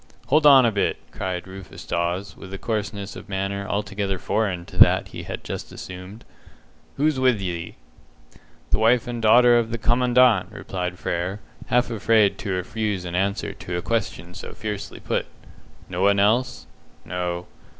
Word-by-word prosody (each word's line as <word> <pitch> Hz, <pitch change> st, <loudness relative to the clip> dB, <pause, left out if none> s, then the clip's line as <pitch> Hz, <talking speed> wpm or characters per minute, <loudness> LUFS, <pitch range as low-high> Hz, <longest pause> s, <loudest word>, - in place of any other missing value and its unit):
"Hold 150 Hz, +1 st, +5 dB
on 135 Hz, -3 st, +8 dB
a 115 Hz, -, +3 dB
bit!" 100 Hz, -2 st, 0 dB
cried 90 Hz, -2 st, -4 dB
Rufus 95 Hz, 0 st, -10 dB
Dawes, 85 Hz, +3 st, -2 dB
with 95 Hz, -, -11 dB
a 95 Hz, -, -5 dB
coarseness 105 Hz, -2 st, -3 dB
of -, -, -10 dB
manner 100 Hz, 0 st, -2 dB
altogether 100 Hz, -1 st, -2 dB
foreign 95 Hz, -3 st, -1 dB
to -, -, -12 dB
that -, -, +6 dB
he -, -, -7 dB
had -, -, -6 dB
just -, -, -6 dB
assumed. 95 Hz, +4 st, -9 dB, 0.7 s
"Who's 150 Hz, -1 st, +2 dB
with 130 Hz, -4 st, +3 dB
ye?" 85 Hz, -3 st, -4 dB, 1.0 s
"The -, -, +3 dB
wife 115 Hz, +2 st, +4 dB
and 120 Hz, -1 st, -4 dB
daughter 120 Hz, +2 st, +6 dB
of 115 Hz, -1 st, -2 dB
the 115 Hz, -, -2 dB
Commandant," 120 Hz, -3 st, +3 dB
replied 90 Hz, -1 st, -4 dB
Frere, 90 Hz, +5 st, -2 dB, 0.3 s
half 125 Hz, 0 st, +2 dB
afraid 105 Hz, -2 st, +3 dB
to 100 Hz, -, -3 dB
refuse 95 Hz, +1 st, -2 dB
an 85 Hz, -, -5 dB
answer 100 Hz, +2 st, -1 dB
to 90 Hz, -3 st, -5 dB
a 85 Hz, -, -4 dB
question 100 Hz, -6 st, -2 dB
so -, -, -8 dB
fiercely 105 Hz, -2 st, -5 dB
put. -, -, -2 dB, 0.6 s
"No 90 Hz, 0 st, -4 dB
one 100 Hz, +1 st, +4 dB
else?" 105 Hz, -6 st, +2 dB, 0.4 s
"No." 90 Hz, -1 st, -3 dB
100 Hz, 160 wpm, -23 LUFS, 90-115 Hz, 1.0 s, on